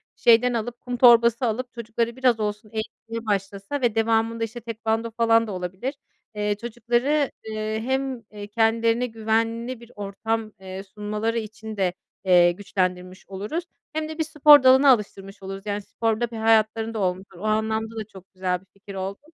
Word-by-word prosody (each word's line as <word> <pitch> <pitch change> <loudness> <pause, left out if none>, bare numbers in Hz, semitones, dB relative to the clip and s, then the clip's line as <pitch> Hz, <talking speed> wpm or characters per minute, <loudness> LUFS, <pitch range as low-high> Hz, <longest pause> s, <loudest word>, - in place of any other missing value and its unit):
şeyden 245 +1 +5
alıp, 235 +1 -3
kum 245 -1 -4
torbası 235 0 +6
alıp 240 +2 -2
çocukları 235 0 -2
biraz 255 -3 +2
olsun 210 +1 -3
eğitmeye 225 +1 -6
başlasa 200 +5 -2
ve 235 -3 +1
devamında 225 0 +1
işte 225 +2 -5
tekvando 225 0 -2
falan 230 0 +3
da - - -5
olabilir. 185 +9 -4 0.4
Eee, 210 0 0
çocukları, 240 +5 0
eee, 215 0 -3
hem 265 -1 -1 0.3
kendilerine 230 +2 +2
güvenli 230 +2 -1
bir 235 0 -15
ortam, 215 +2 -3
eee, 190 0 -7
sunmaları 210 +3 -3
için 220 0 -8
de, 185 -2 +1 0.3
eee, 175 -2 +6
güçlendirmiş 185 0 -3
oluruz 210 - -4 0.3
hem 310 0 -2
de 315 - -7
bir 320 - +1
spor 300 -3 +7
dalını 265 +2 +7
alıştırmış 200 -5 0
oluruz, 195 +1 -7
yani, 205 0 -2
spor 225 +2 -2
da 240 -1 -1
bir 230 - -6
hayatlarında 220 0 +2
olmuşlar 185 -1 -2
o 180 - -10
anlamda 220 +1 0
da 220 -1 -4
çok 190 +1 -14
güzel 185 -1 -1
bir - - -24
fikir 200 0 -11
oldu. 195 +1 -4
225 Hz, 165 wpm, -24 LUFS, 205-235 Hz, 0.4 s, spor